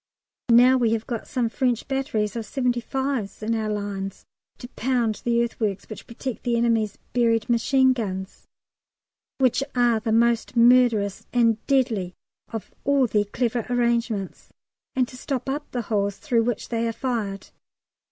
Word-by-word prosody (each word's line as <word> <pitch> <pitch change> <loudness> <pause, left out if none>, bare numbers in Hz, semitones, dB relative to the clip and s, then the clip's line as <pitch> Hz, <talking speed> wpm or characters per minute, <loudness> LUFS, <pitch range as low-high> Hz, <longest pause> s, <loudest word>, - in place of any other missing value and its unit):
Now 245 +2 +7
we 230 -3 +2
have 225 -1 -2
got 235 -3 -5
some 245 -2 0
French 245 0 -1
batteries 250 -7 -1
of 230 - -3
75's 250 -3 -2
in 225 +2 0
our 220 -1 -1
lines 200 -2 -4 0.3
to 245 - -9
pound 240 -4 -1
the 235 0 +2
earthworks 215 -4 -3
which 215 - -9
protect 235 +1 -5
the 240 -1 0
enemy's 225 -3 +1 0.2
buried 230 -2 +2
machine 260 +2 +3
guns, 190 -5 -5 0.9
which 265 0 +2
are 240 -2 +3
the 225 0 -2
most 235 +1 +2
murderous 235 -4 +4
and 230 -3 +2
deadly 225 -10 +1 0.4
of 225 -2 -6
all 280 -1 +3
their 210 -3 +1
clever 235 +2 -1
arrangements, 235 -5 -1 0.4
and 255 -2 +2
to 255 - -11
stop 260 -1 -3
up 290 +2 -3
the 245 -2 -3
holes 200 -2 -1
through 230 -2 +1
which 240 -3 -2
they 230 -1 0
are 230 - -2
fired. 220 -6 -3
235 Hz, 150 wpm, -24 LUFS, 215-250 Hz, 0.9 s, Now